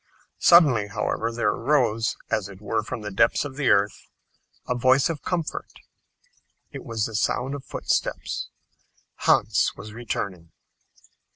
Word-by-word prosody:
Suddenly, 145 -12 +6
however, 115 +3 -2
there 120 +1 +1
arose, 115 -4 +1
as 100 -2 0
it 95 -2 -12
were 110 +1 -1
from 115 +2 -6
the 105 0 -5
depths 95 - +2
of 135 -2 -7
the 140 -2 +1
earth, 100 0 +2 0.6
a - - +1
voice 130 +5 +3
of 150 -4 -6
comfort. 170 0 -3 1.0
It - - -8
was 110 -2 -2
the 115 - -6
sound 125 +5 0
of 140 -2 -6
footsteps! - - -2 0.7
Hans - - +2
was 105 +1 -10
returning. 100 -7 -5
115 Hz, 135 wpm, -24 LUFS, 105-130 Hz, 1.0 s, Suddenly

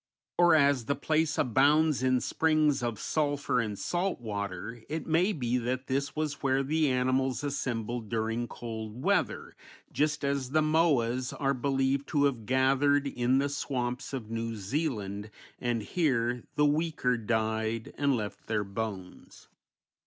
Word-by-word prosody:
Or 175 -2 +5
as 140 -5 +3
the 140 - 0
place 155 +2 0
abounds 145 +3 +3
in 130 -1 +2
springs 155 -3 +2
of 120 -3 -2
sulphur 145 -4 0
and 105 -4 -2
salt 180 - -1
water 100 0 -5
it 160 +1 -3
may 170 +5 +2
be 125 - -1
that 125 +2 -2
this 140 +2 -2
was 155 -1 -2
where 135 0 +2
the 155 +1 +1
animals 130 0 +1
assembled 120 -5 -3
during 115 +1 -1
cold 110 0 -7
weather, - - 0 0.4
just 150 0 0
as 140 -2 -1
the 155 +3 +2
moas 135 -6 +2
are 140 -1 +2
believed 135 +1 0
to 145 -2 +1
have 125 -6 -1
gathered 135 +2 +3
in 125 -1 +1
the 140 +1 +2
swamps 125 -3 -3
of 120 -5 -5
New 115 0 -3
Zealand, 105 - -3 0.3
and 120 -3 -1
here 125 - 0
the 150 0 +4
weaker 150 -4 +1
died 110 0 -1
and 140 -1 +2
left 105 -2 -6
their 105 -2 0
bones. 100 -2 -7
130 Hz, 145 wpm, -29 LUFS, 115-145 Hz, 0.4 s, Or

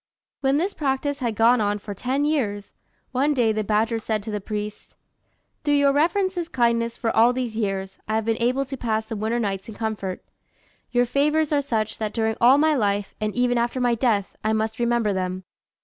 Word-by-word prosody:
When 270 0 +2
this 375 +6 0
practice 285 0 -1
had 235 -4 -2
gone 230 +2 +4
on 205 0 +1
for 205 0 -7
ten 260 +8 -1
years, 210 -10 -1 0.4
one 280 +3 +1
day 235 -4 +3
the 215 0 -1
badger 220 +2 +1
said 215 -1 -2
to 220 - -5
the 210 -1 -3
priest, 210 +1 -6 0.7
"Through 290 -1 +2
your 285 -1 +4
reverence's 350 +3 +1
kindness 235 -1 +1
for 230 -2 -1
all 235 +3 +5
these 245 -3 -3
years, 195 -3 -3
I 215 - -1
have 220 -1 0
been 225 0 0
able 255 +3 +1
to 270 +1 -6
pass 220 -3 -1
the 220 - -5
winter 220 +3 -1
nights 195 -2 -3
in 220 - -8
comfort. 210 -4 -4 0.6
Your 245 0 +2
favours 300 +4 +1
are 290 - +3
such, 220 -6 -2
that 215 -1 -2
during 220 -1 0
all 250 +4 +7
my 310 +1 +4
life, 205 -6 0
and 215 -1 -2
even 245 -1 +2
after 240 +2 -1
my 245 -1 +2
death, 225 -4 0
I 215 0 +1
must 220 +1 -1
remember 235 -3 +1
them. 185 0 -3
230 Hz, 205 wpm, -24 LUFS, 215-265 Hz, 0.7 s, all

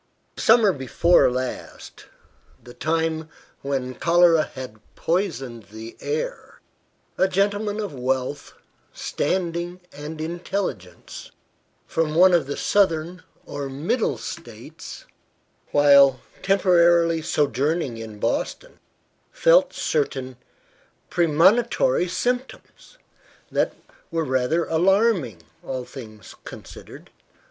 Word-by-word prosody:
SUMMER 220 -3 +4
before 145 +5 +3
last, 130 0 -6 0.6
the 120 - -12
time 160 +1 -1 0.3
when 135 -2 -3
cholera 170 +1 +4
had 125 -5 -8 0.2
poisoned 135 - -2
the 110 +2 -10
air, - - -4 0.6
a 190 - +4
gentleman 205 +2 0
of 205 -7 -4
wealth, 130 +2 -3 0.4
standing 175 -1 -2
and 150 +2 -8
intelligence, 165 - -5 0.6
from 160 -1 -1
one 185 +2 +6
of 170 -5 +2
the 145 - -4
Southern 175 -3 +1 0.2
or 140 -1 -5
Middle 160 - -1
States, - - -9 0.6
while 140 -2 +6 0.2
temporarily 170 -4 +3
sojourning 145 -3 0
in 110 -2 -8
Boston, 120 - -3 0.5
felt - - +4
certain 130 - -2 0.8
"premonitory 175 - +3
symptoms," 250 - -4 0.5
that - - 0 0.3
were 165 -2 -1
rather 130 +5 +1
alarming, 175 - +1 0.2
all 130 -2 -5
things 110 -6 -11
considered. - - -12
160 Hz, 90 wpm, -23 LUFS, 130-185 Hz, 0.8 s, one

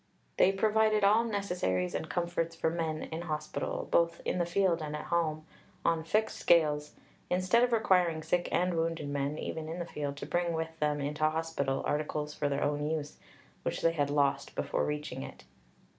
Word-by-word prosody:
They 190 - +6
provided 215 +1 +2
all 210 +3 +5
necessaries 180 - -1
and 160 - -3
comforts 170 -1 -1
for 160 -1 0
men 160 -2 -2
in 160 +1 -5
hospital 155 -3 -3
(both 170 0 +3
in - - 0
the 175 - +1
field 175 -2 +2
and 150 -1 -4
at 150 - -5
home) 155 -2 0 0.4
on 165 -1 +2
fixed 215 +7 0
scales, 150 -3 +3 0.3
instead 185 +6 +3
of 245 - +2
requiring 180 -8 +3
sick 175 +2 0
and 180 0 +2
wounded 165 -2 -1
men 140 +1 -1
(even 160 -1 -4
in 165 - -4
the 175 - -3
field) 145 -3 -4
to - - -5
bring 175 -1 0
with 160 0 -4
them 150 -1 +1
into 150 +2 +1
hospital 155 -4 -1
articles 150 0 -1
for 145 -1 -1
their 140 0 0
own 145 +1 0
use, 155 -2 -3 0.4
which - - -3
they 165 - +5
had 145 -4 0
lost 145 -1 +1
before - - 0
reaching 150 -3 -3
it." - - -9
160 Hz, 185 wpm, -31 LUFS, 150-175 Hz, 0.4 s, They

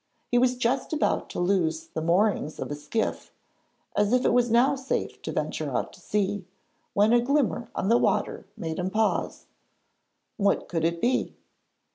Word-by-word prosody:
He 245 - +4
was 250 0 +2
just 255 +4 0
about 310 - 0
to - - -5
loose 170 -3 +1
the 160 - -5
moorings 170 -1 +1
of - - -4
his 145 0 -7
skiff, 220 +8 -2 0.6
as 205 0 +2
it 250 -1 +3
was 245 0 +3
now 240 +4 +4
safe 265 0 -3
to - - -4
venture - - -2
out - - -2
to - - -15
sea, 205 -2 -1 0.5
when 210 +3 +4
a 240 - +5
glimmer 260 -3 0
on - - -1
the 235 +3 +5
water - - 0
made 160 0 -4
him 180 +1 -1
pause. 220 +2 0 0.9
What 200 -1 +1
could 165 -2 -1
it 170 0 -1
be? 250 +2 0
210 Hz, 170 wpm, -26 LUFS, 175-245 Hz, 0.9 s, a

